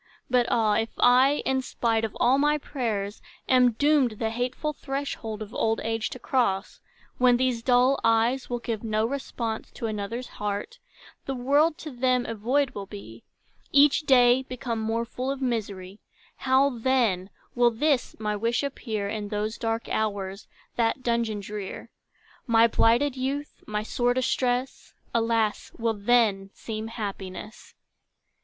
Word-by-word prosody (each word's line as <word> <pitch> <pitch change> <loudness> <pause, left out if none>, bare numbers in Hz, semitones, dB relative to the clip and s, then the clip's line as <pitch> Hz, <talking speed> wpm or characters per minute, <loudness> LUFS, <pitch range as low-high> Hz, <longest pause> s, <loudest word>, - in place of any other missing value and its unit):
But 245 -1 +3
ah! 220 -3 +2
If 225 - -1
I, 260 +4 +5
in 265 0 +1
spite 230 -3 -1
of 220 - -3
all 255 +3 +4
my 295 +1 +3
prayers, 220 -8 -3 0.3
Am 250 -2 +5
doomed 285 -1 +3
the 220 +1 -2
hateful 250 +6 -2
threshold 270 -7 -4
of 215 +2 -12
old 225 0 0
age 225 0 -1
To - - -7
cross, 210 -7 -1 0.4
when 250 -1 +5
these 250 -2 0
dull 250 +2 +3
eyes 230 +3 +2
will 245 - -1
give 230 -2 -4
No 215 -1 0
response 235 -3 -4
to - - -5
another's 220 +3 -4
heart, 210 - -5 0.5
The 270 - -2
world 285 +6 +2
to 305 - -5
them 250 0 +1
a 230 - -3
void 255 +6 +1
will 200 -5 -7
be, 150 - -10 0.5
Each 285 0 +6
day 255 -4 +5
become 250 -3 -4
more 225 +1 -1
full 255 +2 -4
of 275 0 -2
misery, 205 -6 -3 0.4
How 270 +1 +3
then, 225 -7 +1 0.2
will 240 -1 +4
this, 260 +3 0
my 210 -1 -1
wish 230 +5 0
appear 220 -7 -3
In 210 0 -4
those 210 +1 -2
dark 225 -1 -2
hours, 200 -2 -2 0.3
that 235 +2 +1
dungeon 235 -3 0
drear? 205 -1 -7 0.6
My 230 -1 +5
blighted 240 +4 +3
youth, 275 +3 -4
my 210 0 -2
sore 245 +2 0
distress, 255 0 -1 0.2
Alas, 225 -2 0
will 230 -1 0
then 205 -2 +2
seem 220 -1 -5
happiness! 205 -2 -7
235 Hz, 150 wpm, -26 LUFS, 215-255 Hz, 0.6 s, Each